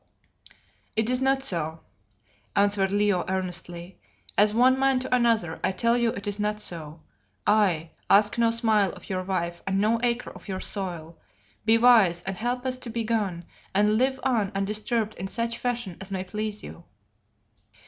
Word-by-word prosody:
"It 220 +2 +1
is 255 0 +1
not 270 0 +2
so," 165 - -2 0.7
answered 200 -1 +3
Leo 205 -3 +2
earnestly. 180 -1 -4 0.4
"As 210 +1 +5
one 255 +4 +4
man 270 -1 +3
to 255 -1 +1
another, 225 -9 +1
I 185 - +2
tell 230 +5 +2
you 235 -1 +2
it 200 - -7
is 205 0 -3
not 210 0 -1
so. 160 -5 -6 0.4
I 185 -7 +2 0.2
ask 205 +3 +5
no 230 -1 +4
smile 220 -4 +2
of - - -10
your 185 -1 -1
wife 175 -2 -3
and 195 0 +1
no 220 +3 +2
acre 240 0 -1
of - - -14
your 190 -2 -3
soil. 170 -6 -4 0.5
Be 225 +1 +5
wise 220 -8 +5
and 190 0 -3
help 245 +4 -2
us 255 0 -1
to 250 - -6
be 230 0 -2
gone, 205 -7 -1 0.3
and 210 +2 +3
live 265 +1 +1
on 230 -7 +1
undisturbed 215 +2 -1
in 190 - -3
such 230 +3 -2
fashion 240 -7 -3
as 190 - -7
may 190 -1 -3
please 210 +2 -4
you." 170 - -10
210 Hz, 170 wpm, -26 LUFS, 185-235 Hz, 0.7 s, As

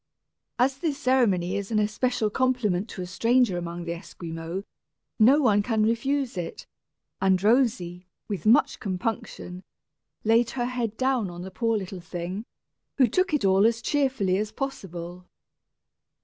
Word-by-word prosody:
As 265 +2 +2
this 300 -3 -1
ceremony 205 -10 +2
is 200 -1 -3
an 220 - 0
especial 215 +1 0
compliment 230 -6 +1
to 185 - -6
a - - -4
stranger 230 +3 +2
among 170 0 -5
the 170 - -2
Esquimaux, 165 +1 -6 0.6
no 255 +7 +6
one 215 -8 +4
can 220 0 +1
refuse 245 +2 0
it; 170 -2 -5 0.6
and 190 -1 +3
Rosy, 210 -7 +1 0.2
with 200 -4 -4
much 230 - +4
compunction, 185 -2 -4 0.6
laid 230 +2 +3
her 240 - +1
head 240 -3 -3
down 255 -6 +1
on 175 0 -8
the 190 - -8
poor 225 +3 0
little 190 -2 -6
thing, 180 +5 -5 0.5
who 265 - +6
took 365 - +1
it 295 -9 +1
all 190 +1 +4
as 230 +1 +3
cheerfully 255 -10 +1
as 210 0 -2
possible. 180 -9 -6
215 Hz, 150 wpm, -26 LUFS, 180-250 Hz, 0.6 s, no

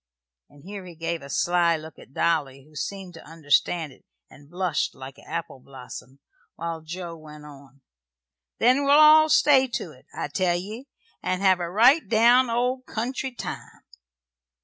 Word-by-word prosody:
and 145 -1 -19
here 200 +1 -8
he 175 -2 -11
gave 165 +1 -4
a 140 - -11
sly 170 +2 +2
look 155 -1 -12
at - - -16
Dolly, 140 -4 -1
who 155 +2 -22
seemed 190 +3 -6
to 165 - -12
understand 160 0 0
it - - -24 0.3
and 145 0 -17
blushed 175 -3 -2
like 135 +1 -11
an - - -18
apple 170 -5 -5
blossom, 130 0 -11 0.4
while 165 -1 -5
Joe 170 +1 -7
went 150 -1 -13
on: 140 -2 -15 0.8
"Then 255 +4 +3
we'll 280 0 +3
all 310 +1 +7
stay 270 -3 +5
to 245 - -5
't, - - -39
I - - -4
tell 180 -2 0
ye, 215 +9 -8 0.3
and 185 +1 -2
have 190 -2 +4
a 170 -1 -3
right 245 - +4
down 240 +3 +4
old 250 +2 -1
country 260 +4 -4
time." 245 - -8
175 Hz, 170 wpm, -24 LUFS, 150-230 Hz, 0.8 s, all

